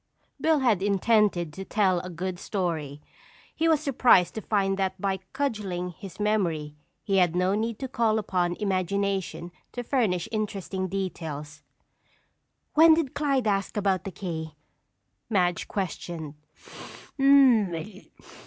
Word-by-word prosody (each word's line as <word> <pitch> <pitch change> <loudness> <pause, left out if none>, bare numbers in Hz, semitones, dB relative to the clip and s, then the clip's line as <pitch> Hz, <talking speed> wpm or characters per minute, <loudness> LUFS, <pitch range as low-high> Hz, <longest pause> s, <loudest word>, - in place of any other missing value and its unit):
Bill 315 -3 +3
had 225 -8 +2
intended 200 -4 +2
to 190 - -6
tell 190 -3 +1
a 180 - -7
good 180 +1 -4
story. 160 -7 -3 0.5
He 325 - +1
was 310 -2 +3
surprised 250 - +4
to 220 - -5
find 195 -2 +1
that 190 0 -1
by 195 0 0
cudgeling 200 -10 -2
his 190 +2 -11
memory 175 -8 0 0.3
he 195 -1 +1
had 175 -2 +3
no 180 +2 +2
need 220 +1 -1
to 265 - -4
call 230 -3 +1
upon 180 -4 0
imagination 195 -2 -2 0.2
to 245 - -4
furnish 220 - 0
interesting 195 -3 -3
details. 160 -6 -5 1.1
"When 320 +1 +7
did 315 -5 -1
Clyde 275 -4 0
ask 200 -1 0
about 195 -2 +1
the 195 - -4
key?" 160 -4 -5 0.7
Madge 180 -5 +1
questioned. 170 -5 -4
195 Hz, 125 wpm, -26 LUFS, 175-215 Hz, 1.1 s, When